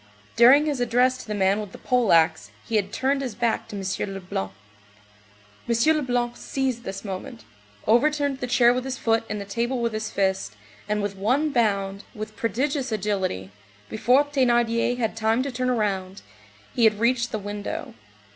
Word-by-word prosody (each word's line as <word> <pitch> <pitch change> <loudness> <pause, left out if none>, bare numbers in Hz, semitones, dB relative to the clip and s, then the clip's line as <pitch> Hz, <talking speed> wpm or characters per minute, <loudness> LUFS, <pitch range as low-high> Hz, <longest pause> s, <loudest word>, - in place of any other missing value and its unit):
During 260 +6 +7
his 290 -4 -1
address 245 +2 +2
to - - -10
the 210 - -3
man 195 +1 +2
with 205 -2 -9
the - - -9
pole 250 -4 +1
axe, 160 -1 +3 0.2
he 230 - -2
had 200 -1 -1
turned 275 +4 0
his 250 -6 -4
back 235 -2 -1
to - - -8
M. 195 +1 -3
Leblanc. 180 - -4 1.2
M. 235 +7 +3
Leblanc 245 -4 -1
seized 260 -3 -3
this 195 +2 -6
moment, 190 - -6 0.4
overturned 285 +4 +2
the 250 - -3
chair 245 -1 +5
with 250 0 -2
his 265 -1 -4
foot 225 0 +1
and 210 - -3
the 200 - -6
table 235 +5 -2
with 235 -1 -1
his 215 0 -3
fist, 190 - -1 0.3
and 210 -1 0
with 205 -1 -3
one 255 +10 +1
bound, 200 -5 0
with 215 0 -7
prodigious 265 +4 -1
agility, 190 - -2 0.4
before 250 +5 +3
Thénardier 240 -4 +1
had 225 -3 -1
time 225 +2 +1
to 280 - -3
turn 255 +1 -1
round, 195 -5 -2 0.5
he 235 - +3
had 215 -1 +3
reached 240 +1 +1
the - - -1
window. 205 0 -5
230 Hz, 175 wpm, -24 LUFS, 205-250 Hz, 1.2 s, During